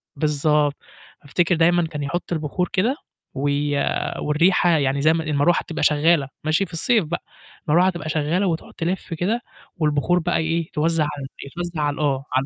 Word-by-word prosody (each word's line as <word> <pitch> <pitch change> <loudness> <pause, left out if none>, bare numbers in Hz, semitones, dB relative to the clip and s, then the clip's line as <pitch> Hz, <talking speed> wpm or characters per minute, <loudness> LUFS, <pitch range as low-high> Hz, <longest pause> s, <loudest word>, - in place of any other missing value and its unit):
بالضبط، 150 0 +1 0.5
أفتكر 170 +4 +1
دايمًا 170 +1 +3
كان 150 -2 -5
يحُط 175 +5 -4
البخور 160 +3 -2
كده 225 +9 +2 0.4
وي 145 +1 0 0.4
والريحة 170 +4 +3
يعني 140 -4 +2
زي 155 +2 +4
ما 165 -1 -1
المروح 155 +2 +2
تبقى 165 -2 -5
شغّالة 150 -1 +3 0.2
ماشي؟ 160 +5 +1
في 165 - -15
الصيف 215 +3 +2
بقى، 170 +3 -4 0.5
المروح 180 +4 +5
تبقى 165 -3 -5
شغّالة 160 +6 0
وتقعُد 165 -2 -3
تلِف 175 0 -3
كده 205 +9 -1 0.4
والبخور 155 +3 +1
بقى 175 +1 0
إيه، 165 +1 -1
توزع 165 0 +1
على 145 -1 -4
الب 135 +1 -10
توزع 175 -3 -4
على 145 -1 +1
ال 145 - -9
آه، 135 -2 0
على 130 +1 +2
160 Hz, 175 wpm, -22 LUFS, 145-175 Hz, 0.5 s, المروح